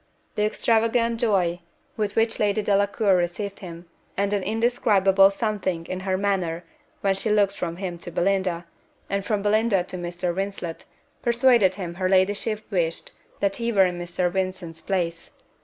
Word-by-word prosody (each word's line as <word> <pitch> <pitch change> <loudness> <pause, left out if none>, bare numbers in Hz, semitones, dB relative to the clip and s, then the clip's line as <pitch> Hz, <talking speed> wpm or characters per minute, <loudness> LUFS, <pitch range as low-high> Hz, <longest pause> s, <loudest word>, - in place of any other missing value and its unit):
The 210 - +1
extravagant 230 +1 +1
joy 185 -7 +1 0.4
with 210 -2 -2
which 225 0 +1
Lady 210 0 +1
Delacour 200 0 +2
received 185 +3 -2
him, 170 -2 -9 0.3
and 200 +1 0
an 205 - +1
indescribable 200 -3 +3
something 195 -5 -2
in 185 - -4
her 185 0 -1
manner 185 -4 -1 0.4
when 195 -1 +2
she 195 +3 0
looked 205 -2 +3
from 170 -3 -4
him 180 -2 -5
to 175 - -8
Belinda, 180 -1 0 0.5
and 200 0 0
from 210 -1 -1
Belinda 210 -2 +2
to 185 - -7
Mr. 175 0 -3
Vincent, 190 -3 -4 0.4
persuaded 235 -5 +4
him 180 -4 -5
her 185 +1 -1
ladyship 200 +3 +1
wished 170 -4 -1 0.3
that 195 -1 +1
he 235 0 -1
were 195 -4 +5
in 175 -1 -2
Mr. 175 0 -1
Vincent's 185 -3 -3
place. 170 -2 -2
195 Hz, 155 wpm, -24 LUFS, 180-210 Hz, 0.5 s, were